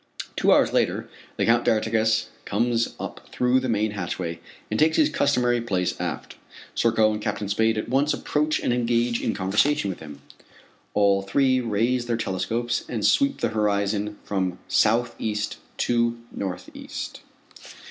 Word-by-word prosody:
Two - - +3
hours - - +4
later - - +1 0.3
the - - +1
Count 120 +1 +4
d'Artigas 110 0 +1
comes 115 +2 0
up - - -7
through 125 +1 +2
the 130 -1 -3
main 110 -1 +1
hatchway 85 -4 -4 0.3
and 110 - 0
takes 160 +1 +4
his 305 - +4
customary 125 -4 +2
place 95 -6 0
aft. - - -5 0.4
Serko 110 -2 +3
and 105 - -4
Captain 105 -1 -2
Spade 110 +2 +2
at 110 - -2
once 135 +4 +2
approach 150 +1 0
and - - +1
engage 120 0 +1
in - - -1
conversation 100 +4 +1
with 90 - -8
him. 75 -3 -10 0.8
All 100 -1 +4
three 130 +6 +2
raise 120 +2 0
their 120 -1 0
telescopes 110 +3 -1
and 115 -4 -2
sweep 280 0 +3
the - - +1
horizon 105 -1 0
from 95 -3 -2
southeast 110 -2 +1 0.2
to 120 -1 +1
northeast. 90 -2 -6
110 Hz, 145 wpm, -24 LUFS, 100-120 Hz, 0.8 s, hours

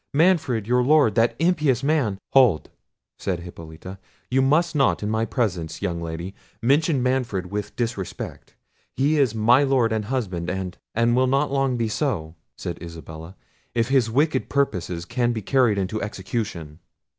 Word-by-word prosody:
Manfred, 155 - +3
your 125 +2 +2
lord, 140 -4 +4
that 115 +3 +2
impious 155 -7 +2
man—" 140 -9 +1
"Hold," 125 -12 +4 0.5
said 90 -3 -2
Hippolita; 85 +2 -10 0.3
"you 130 +1 +3
must 160 +6 +2
not 135 -6 +2
in 105 - -1
my 110 +1 +1
presence, 85 - -2
young 85 -1 -2
lady, 85 +3 -5 0.3
mention 140 +2 +2
Manfred 120 -8 -1
with 105 0 -4
disrespect: 115 -6 -5 0.4
he 145 +3 +2
is 125 -6 +2
my 120 +5 +5
lord 130 -5 +2
and 110 -1 -1
husband, 100 -9 -2
and—" 95 -1 -4 0.4
"Will 130 +1 +3
not 135 +2 +1
long 135 -2 +1
be 115 -1 0
so," 105 - -2 0.2
said 85 - -6
Isabella, 80 +1 -9 0.4
"if 115 +1 +1
his 130 -4 +3
wicked 135 +3 +1
purposes 90 - -1
can 120 +2 0
be 110 -3 -4
carried 125 -3 +3
into 100 +3 -2
execution." 95 -6 -4
115 Hz, 155 wpm, -23 LUFS, 95-135 Hz, 0.5 s, my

